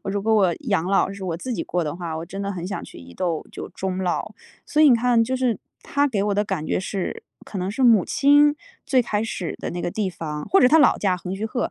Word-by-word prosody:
如 195 0 -2
果 220 +1 +1
我 190 -5 +3
养 195 -6 +1
老， 195 0 +2
是 200 -1 -8
我 165 -3 -2
自 250 +8 -5
己 - - -2
过 175 -1 -1
的 150 -2 -3
话， 170 -3 -5
我 160 - -5
真 195 +3 -7
的 200 0 -2
很 175 -1 -5
想 200 - -4
去 - - -12
伊 85 0 -13
豆 170 - -2
就 - - -7
终 190 -1 -4
老。 180 -2 -2 0.3
所 300 - 0
以 305 - +8
你 - - +7
看， 235 0 +3
就 260 +3 -2
是 250 -4 0 0.2
她 285 0 +1
给 215 -8 -1
我 205 -1 0
的 205 - +1
感 185 -6 -3
觉 - - 0
是 190 0 -4 0.2
可 200 - -6
能 185 +1 -2
是 260 +5 -2
母 225 -6 +6
亲 290 +1 +4 0.3
最 255 -2 +3
开 215 -2 -1
始 185 -6 -4
的 - - -4
那 175 - -4
个 - - -2
地 205 +1 -1
方， 150 -4 -5
或 390 - +5
者 250 - +6
她 315 - +5
的 315 - +6
老 - - +5
家 185 -3 +1
横 180 +1 -5
须 205 - -4
贺。 230 +3 -2
200 Hz, 295 characters per minute, -23 LUFS, 180-240 Hz, 0.3 s, 以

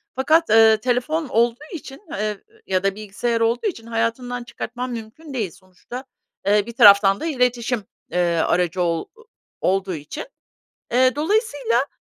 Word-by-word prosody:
Fakat, 315 +6 +3
eee, 220 0 +7
telefon 255 +7 -1
olduğu 235 +4 +1
için, 280 -3 -9
eee, 210 0 -3 0.2
ya 185 0 0
da 195 0 +1
bilgisayar 215 +3 -2
olduğu 230 - +1
için 230 - -5
hayatından 235 +2 -2
çıkartman 245 +1 -6
mümkün 240 +7 -8
değil 215 -9 -2
sonuçta, 185 +9 -11 0.4
eee, 205 0 +4
bir 235 - -7
taraftan 200 -3 +7
da - - -4
iletişim, 245 -6 0 0.3
eee, 175 -1 +1
aracı 175 +2 +1
ol 170 -2 0 0.6
olduğu 190 -1 0
için. 155 - -7 0.7
Eee, 255 +2 +4
dolayısıyla, 290 - +1
230 Hz, 140 wpm, -22 LUFS, 200-255 Hz, 0.7 s, eee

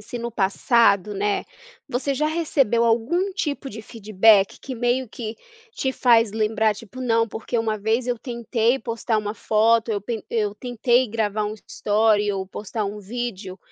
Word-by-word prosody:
se 240 +3 -7
no 235 0 -4
passado, 205 -1 +2
né, 205 +1 -1 0.4
você 275 +3 -2
já 305 +3 0
recebeu 290 -8 +1
algum 245 - +1
tipo 290 -7 -3
de 220 -1 -8
feedback 210 -2 +3
que 260 - -7
meio 245 +2 0
que 220 0 -6 0.4
te 265 -1 -2
faz 230 -5 +4
lembrar, 220 0 +1
tipo: 230 +3 -11
"Não, 230 -2 +1
porque 230 +3 -3
uma 220 -1 0
vez 225 +4 0
eu 245 -2 -1
tentei 235 +1 0
postar 230 -1 -2
uma 210 0 -3
foto, 225 +1 +2
eu 205 - -1
pen 220 +2 -5
eu 210 -3 0
tentei 245 +1 +1
gravar 210 -1 -1
um 210 +1 -3
story 210 -1 +2
ou 190 -1 -3
postar 210 +2 -4
um 210 +1 -5
vídeo, 205 -3 -5
225 Hz, 165 wpm, -23 LUFS, 210-245 Hz, 0.4 s, faz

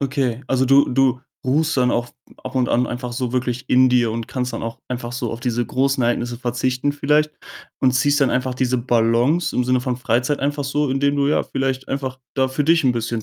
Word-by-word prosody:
Okay. 135 -3 -1
Also, 130 0 +1
du 135 +2 +5
du 130 0 +2 0.2
ruhst 150 +4 +1
dann 125 -1 +3
auch 120 +1 -1 0.4
ab - - -6
und 130 -2 +1
an 125 +1 +2
einfach 120 0 -5
so 125 -1 -3
wirklich 125 0 -2
in 130 0 +5
dir 120 -3 +2
und 115 0 -5
kannst 125 -1 -3
dann - - -5
auch 115 0 -5
einfach 120 -1 -4
so 120 -1 -3
auf 115 - -7
diese 120 -1 -1
großen 135 +1 0
Ereignisse 120 0 -1
verzichten 125 +3 -1
vielleicht 150 +1 +1 0.5
und 130 -2 +3
ziehst 145 +3 +2
dann 135 - +3
einfach 125 0 -1
diese 125 0 0
Balance 120 +7 +1
im 125 - +2
Sinne 125 0 +2
von 125 -1 -2
Freizeit 125 +3 0
einfach 145 +1 -1
so, 145 +1 0
indem 140 +2 +1
du 140 - +2
ja - - +2
vielleicht 135 0 -3
einfach 130 -1 -4
da 130 -1 +2
für 135 +3 -1
dich 165 0 +3
'n 125 - +4
bisschen 115 -1 -3
130 Hz, 220 wpm, -21 LUFS, 120-135 Hz, 0.5 s, du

